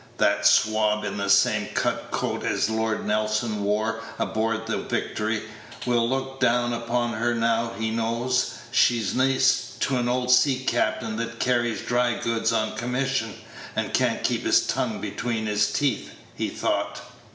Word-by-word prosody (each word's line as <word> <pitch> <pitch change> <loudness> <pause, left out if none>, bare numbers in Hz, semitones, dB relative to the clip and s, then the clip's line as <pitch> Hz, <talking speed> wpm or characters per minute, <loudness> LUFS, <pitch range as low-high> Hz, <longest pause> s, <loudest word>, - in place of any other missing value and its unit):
"That - - +3
swab 105 0 +3
in 105 - -3
the 100 -1 -2
same - - +4
cut - - -1
coat - - -2
as 110 - 0
Lord 110 0 -1
Nelson 105 0 0
wore 110 +2 0 0.2
aboard 115 0 -1
the 115 - -2
Victory, 110 0 -2 0.4
will 120 -1 +2
look 135 0 -3
down 120 -1 +2
upon 120 0 -1
her 115 +2 0
now 115 0 +1
he 110 0 -1
knows 115 +3 0 0.2
she's 120 -4 +3
niece 130 0 +2
to 135 - +1
a 120 - 0
old 125 0 0
sea 130 +1 +4
captain 110 -2 0
that 115 0 -4
carries 120 -2 0
dry 120 -1 +1
goods 115 0 0
on 110 -1 0
commission, 125 -1 -1 0.4
and - - -2
can't - - +1
keep - - +1
his - - +3
tongue - - -1
between 115 -3 -3
his 105 0 +1
teeth," 145 -2 0 0.3
he - - -2
thought. 100 0 -2
115 Hz, 155 wpm, -25 LUFS, 110-125 Hz, 0.4 s, same